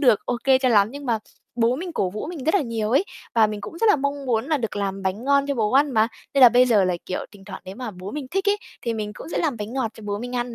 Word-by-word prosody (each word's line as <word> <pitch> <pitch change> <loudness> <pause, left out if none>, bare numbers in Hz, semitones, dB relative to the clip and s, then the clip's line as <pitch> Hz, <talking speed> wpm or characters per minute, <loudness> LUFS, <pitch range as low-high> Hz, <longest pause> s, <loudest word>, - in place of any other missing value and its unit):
được 245 -8 +5
ô 245 - -1
kê 265 -1 +5
cho 260 -1 +1
lắm 210 -3 +4
nhưng 285 0 -8
mà 230 -2 +1 0.4
bố 235 +2 +2
mình 355 0 -5
cổ 185 - 0
vũ 210 +8 -5
mình 315 -7 -6
rất 320 - +2
là 400 - +4
nhiều 225 -3 -2
ấy, 280 +10 +3 0.3
và 220 -2 +5
mình 210 -1 -5
cũng 335 - -8
rất 450 - +3
là - - +4
mong 280 0 -3
muốn 225 -1 +1
là 310 -1 +1
được 225 -3 -4
làm 195 -1 -2
bánh 195 +6 -2
ngon 280 0 +3
cho 280 - -1
bố 215 -2 0
ăn 280 +2 +4
mà, 220 -1 +3 0.3
nên 275 - +3
là 250 - +11
bây 250 +2 +5
giờ 210 -5 +4
là, 180 -1 0
kiểu, 185 - -3
thỉnh 195 -1 -15
thoảng 195 -2 -9
nếu 190 +3 -9
mà 250 -4 -5
bố 185 +1 -8
mình 290 -3 -5
thích 390 +2 0
ấy 410 - +3 0.3
thì 235 -1 -1
mình 210 -1 -4
cũng - - -9
sẽ - - -2
làm 295 -7 0
bánh 210 +2 -6
ngọt 255 -4 -1
cho 220 - -13
bố 205 0 -2
mình 245 +2 -5
ăn 240 -1 -3
240 Hz, 325 wpm, -23 LUFS, 210-280 Hz, 0.4 s, là